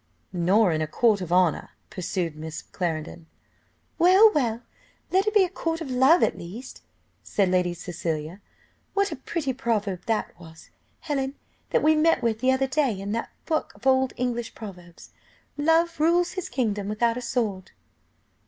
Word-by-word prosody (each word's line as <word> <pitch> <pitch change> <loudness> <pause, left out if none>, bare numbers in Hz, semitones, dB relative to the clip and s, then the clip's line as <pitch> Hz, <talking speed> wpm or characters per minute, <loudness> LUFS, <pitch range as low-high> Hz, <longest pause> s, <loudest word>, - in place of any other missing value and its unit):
"Nor 185 +3 +3
in 155 -1 0
a 155 - -1
court 210 +4 +2
of 175 -2 -5
honour," 180 -3 +2 0.2
pursued 175 -3 -3
Miss 155 +1 -7
Clarendon. 165 -1 -4 0.7
"Well, 380 +6 +7
well! 235 -5 0 0.5
let 385 +3 +2
it 425 - +1
be 410 - +7
a - - +1
court 330 -2 -3
of 305 -6 -6
love 265 +7 +5
at - - +2
least," 210 +10 -9 0.4
said 195 -3 0
Lady 180 -1 +1
Cecilia. 170 0 -4 0.5
"What 400 0 +2
a - - -3
pretty 275 0 -3
proverb 220 -7 -2
that 225 -1 -1
was, 160 -2 -14 0.3
Helen, 275 -2 -2 0.3
that - - +1
we 310 +1 +5
met 310 -4 +3
with 225 -2 0
the 260 +2 +3
other 260 +1 +2
day 265 -6 0
in 200 +1 -4
that 230 +2 -2 0.2
book 315 -2 -1
of - - -18
old 265 -1 +3
English 240 -2 -2
proverbs 180 -5 -11 0.4
'Love 325 +3 +2
rules 345 +3 +3
his 370 -2 -5
kingdom 210 -6 -1
without 230 +2 +1
a 250 - -4
sword. 215 -6 -2
230 Hz, 165 wpm, -25 LUFS, 180-290 Hz, 0.7 s, Well